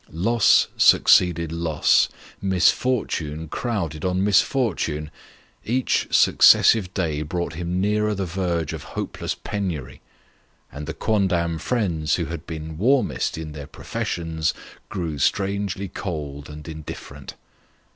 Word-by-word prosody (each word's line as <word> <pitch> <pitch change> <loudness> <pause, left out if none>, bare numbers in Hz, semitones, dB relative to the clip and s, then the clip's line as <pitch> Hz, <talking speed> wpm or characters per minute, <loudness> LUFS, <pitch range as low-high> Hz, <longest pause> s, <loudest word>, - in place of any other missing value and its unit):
Loss 110 +8 +3
succeeded 85 -3 +5
loss; 85 -2 +2 0.3
misfortune 90 -5 0
crowded 85 - -3
on 90 +1 0
misfortune; 95 - +1 0.5
each 125 +3 0
suc - - +3
cessive 100 -6 +6
day 80 -6 -1
brought 85 +2 -3
him 90 +3 -3
nearer 105 +2 +1
the 95 -1 -2
verge 85 -3 -2
of 80 - -6 0.2
hopeless - - -3
penury, 90 -11 -5 0.7
and 75 +1 -7
the 80 - -5
quondam 90 -5 0
friends 85 -5 0
who 85 - -2
had 80 -2 -7
been 80 -1 -7
warmest 130 - +1
in 80 -1 -6
their 75 -2 -8
professions, 80 -1 -3 0.3
grew 80 -6 -4
strangely 100 +3 0
cold 75 -7 -6
and 75 +1 -10
indifferent. 75 -3 -9
85 Hz, 115 wpm, -23 LUFS, 80-100 Hz, 0.7 s, cessive